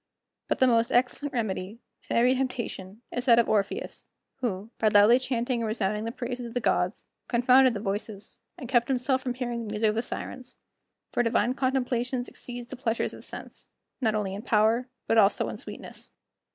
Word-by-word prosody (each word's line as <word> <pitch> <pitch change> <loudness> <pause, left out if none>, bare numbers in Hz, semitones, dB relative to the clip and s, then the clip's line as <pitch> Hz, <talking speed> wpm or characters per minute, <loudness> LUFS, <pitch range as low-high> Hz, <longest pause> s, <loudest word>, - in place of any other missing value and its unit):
But - - 0
the 260 - +5
most 230 -2 +3
excellent 255 +4 +1
remedy, 215 -4 -3 0.3
in - - -1
every 245 +2 +5
temptation, 240 -5 -4
is 245 - -3
that 235 -3 +6
of 235 - +4
Orpheus, 205 -2 -1 0.3
who, 225 -4 -3
by 220 - +3
loudly 210 +4 +6
chanting 245 -1 -1
and 225 - -1
resounding 215 -1 -1
the 230 - -2
praises 245 0 -5
of 230 - -11
the - - +2
gods, - - 0 0.2
confounded 250 +1 +5
the - - -2
voices, 205 0 -5 0.2
and 265 -8 -7
kept 240 -1 +2
himself 260 0 +1
from 250 -2 -3
hearing 240 -2 -3
the - - -5
music 215 +1 +2
of - - 0
the 225 - 0
Sirens; 255 +1 -7 0.6
for - - +1
divine 240 +1 +2
contemplations 255 -1 -1
exceed 240 -1 -8
the - - -6
pleasures 240 -3 -1
of - - -11
sense, - - -9 0.3
not 220 -3 +2
only 200 -3 -1
in 200 - -5
power 225 +2 +2 0.2
but 225 - +4
also 200 -1 +3
in - - -6
sweetness. - - -9
235 Hz, 190 wpm, -27 LUFS, 215-250 Hz, 0.6 s, that